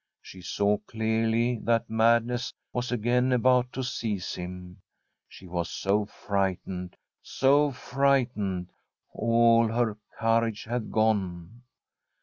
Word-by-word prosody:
She 95 - -12
saw 100 +3 0
clearly 115 +2 0
that 115 -1 +1
madness 115 +2 +1 0.2
was 125 0 -2
again 125 +2 +1
about 125 0 +3
to 130 - -3
seize 110 -6 -3
him. 90 +1 -8 0.5
She - - -14
was 85 -1 -3
so 100 +2 0
frightened, 95 -3 -3 0.2
so 145 +2 +3
frightened, 125 -10 0 0.4
all 115 0 +4
her 110 -2 -1 0.2
courage 115 -1 +1
had 120 -1 -4
gone. 105 -1 -1
115 Hz, 110 wpm, -27 LUFS, 100-120 Hz, 0.5 s, all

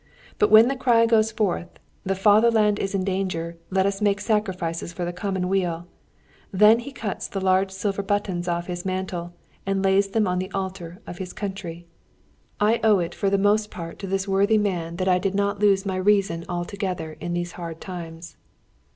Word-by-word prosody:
But 420 - +4
when 220 +2 +8
the 270 - 0
cry 240 -3 +4
goes 220 -1 +3
forth, 200 -5 -1 0.3
"The 195 0 -1
fatherland 210 +1 +4
is 195 +1 -2
in 190 - 0
danger! 185 -3 -2
Let 190 0 +2
us 200 +1 -1
make 205 -1 +2
sacrifices 190 -7 -1
for 175 +1 -4
the 175 - -4
commonweal!" 180 -2 -1 0.7
then 210 +3 +6
he 245 +4 -7
cuts 220 -7 -4
the 195 - -4
large 190 0 +2
silver 195 +1 -2
buttons 195 -3 -2
off 170 0 -1
his 175 -1 -5
mantle, 185 -2 -4 0.3
and 195 0 -1
lays 195 +1 +3
them 215 0 +1
on 180 0 0
the 185 +1 -4
altar 190 -1 -5
of 175 - -8
his 185 -1 -6
country. 185 -4 -6 0.7
I 215 +3 +3
owe 215 -2 +5
it 175 -1 -2
for 195 - 0
the 200 - +2
most 210 +2 +2
part 165 -4 -8
to 195 - -5
this 195 +1 -1
worthy 200 +3 +3
man 175 -5 -1
that 185 +1 -2
I 180 -1 +4
did 195 +1 -1
not 200 0 0
lose 200 -1 +3
my 190 -1 -2
reason 185 -4 +1
altogether 175 -2 -4
in 175 +1 -4
these 175 0 -3
hard 165 -2 -7
times. 170 -2 -8
190 Hz, 190 wpm, -24 LUFS, 175-205 Hz, 0.7 s, when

